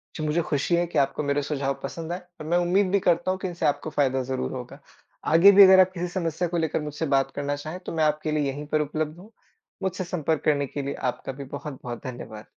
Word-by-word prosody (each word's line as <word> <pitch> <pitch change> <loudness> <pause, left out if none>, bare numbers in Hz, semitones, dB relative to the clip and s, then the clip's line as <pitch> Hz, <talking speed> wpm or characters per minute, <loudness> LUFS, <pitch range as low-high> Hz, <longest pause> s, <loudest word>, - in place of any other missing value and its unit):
जो 155 - -4
मुझे 155 +3 +1
खुशी 150 +2 0
है 175 0 +2
कि - - -4
आपको 140 +2 0
मेरे 140 0 +1
सुझाव 140 -1 -1
पसंद 165 0 -5
आए 180 - -3 0.2
और - - -6
मैं 170 +2 +2
उम्मीद 180 +2 +2
भी 200 - +3
करता 175 0 +2
हूँ 185 - -3
कि 190 - -3
इनसे 175 -1 -3
आपको 145 +1 0
फायदा 135 -3 +1
ज़रूर 130 0 -3
होगा। 130 +2 -7 0.5
आगे 175 +5 +8
भी 200 0 +9
अगर 190 0 +8
आप 185 0 +5
किसी 180 -1 -3
समस्या 175 -1 -2
को 170 +1 -2
लेकर 160 -1 0
मुझसे 150 +1 -4
बात 135 0 +1
करना 145 0 -1
चाहें 155 +5 -7
तो - - -4
मैं 160 - +2
आपके 155 0 0
लिए 150 -1 +1
यहीं 145 +2 -7
पर 155 0 +1
उपलब्ध 155 +1 -3
हूँ। 205 +5 -14 0.5
मुझसे 190 0 -1
संपर्क 160 -3 -1
करने 145 -2 +2
के 145 - -5
लिए 140 0 -3 0.2
आपका - - -8
भी 135 +1 -8
बहुत-बहुत 135 -3 -7
धन्यवाद। 115 -4 -7
155 Hz, 245 wpm, -25 LUFS, 140-175 Hz, 0.5 s, भी